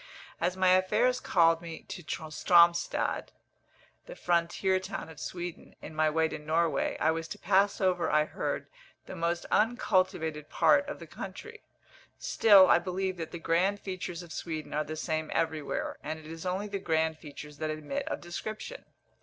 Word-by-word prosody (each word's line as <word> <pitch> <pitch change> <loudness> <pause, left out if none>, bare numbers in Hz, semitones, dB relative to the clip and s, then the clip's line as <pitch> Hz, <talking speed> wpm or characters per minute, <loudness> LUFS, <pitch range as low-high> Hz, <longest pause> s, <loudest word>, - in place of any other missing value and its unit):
As 180 +2 0
my 185 -1 +4
affairs 215 +7 +3
called 165 -5 +3
me 165 -1 -8
to - - -6
Stromstad 170 +2 +2 0.8
(the - - -8
frontier 175 - +1
town 185 - -6
of 160 -1 -12
Sweden) 175 -1 -6
in - - -9
my 155 0 +2
way 160 +1 +2
to 155 - -6
Norway, 160 +2 0
I 160 - +3
was 165 0 -3
to - - -7
pass 200 +2 +2
over, 185 -2 +1
I 150 0 +3
heard, - - -3 0.4
the - - -8
most 170 0 -1
uncultivated 185 -9 +1
part 285 -1 +4
of 295 - -5
the - - -10
country. 455 -1 -9 0.6
Still 200 -4 +6
I - - +6
believe 185 +1 -2
that 165 -2 -5
the - - -6
grand 180 +5 +1
features 185 -3 -5
of 170 -2 -10
Sweden 160 -2 -5
are 150 +1 +1
the 155 +1 -6
same 155 -1 -2
everywhere, 160 -3 -2
and 155 +1 -4
it 155 - -13
is 165 +3 -7
only 190 +3 -2
the 200 -1 -4
grand 160 -3 0
features 150 -1 -10
that 155 - -2
admit 155 - -4
of - - -3
description. 215 - -6
170 Hz, 170 wpm, -30 LUFS, 160-190 Hz, 0.8 s, Still